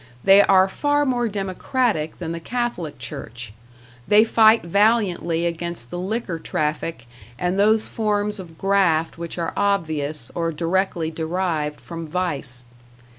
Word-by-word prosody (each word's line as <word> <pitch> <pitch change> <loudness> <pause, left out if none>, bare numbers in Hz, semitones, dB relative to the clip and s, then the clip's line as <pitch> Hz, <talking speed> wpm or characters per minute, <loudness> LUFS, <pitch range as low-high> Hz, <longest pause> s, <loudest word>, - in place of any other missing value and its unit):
They 195 +1 +8
are 190 -1 +5
far 290 +8 +1
more 245 -3 +1
democratic 195 - -1
than 165 -2 -5
the 170 - -4
Catholic 235 -6 -3
Church; 120 -1 -7 0.5
they 210 +1 +6
fight 225 0 +5
valiantly 180 -3 +2
against 170 -6 -4
the 175 - -4
liquor 190 -2 -3
traffic 155 -2 -3 0.3
and 180 +6 -1
those 215 +2 +3
forms 210 -1 -1
of 165 -4 -10
graft 170 -5 +1
which 170 0 -6
are 170 -1 -2
obvious, 155 -9 0
or 165 -1 -1
directly 170 0 -1
derived 160 -2 -2
from 165 -1 -7
vice. 150 -7 -2
175 Hz, 130 wpm, -22 LUFS, 160-205 Hz, 0.5 s, They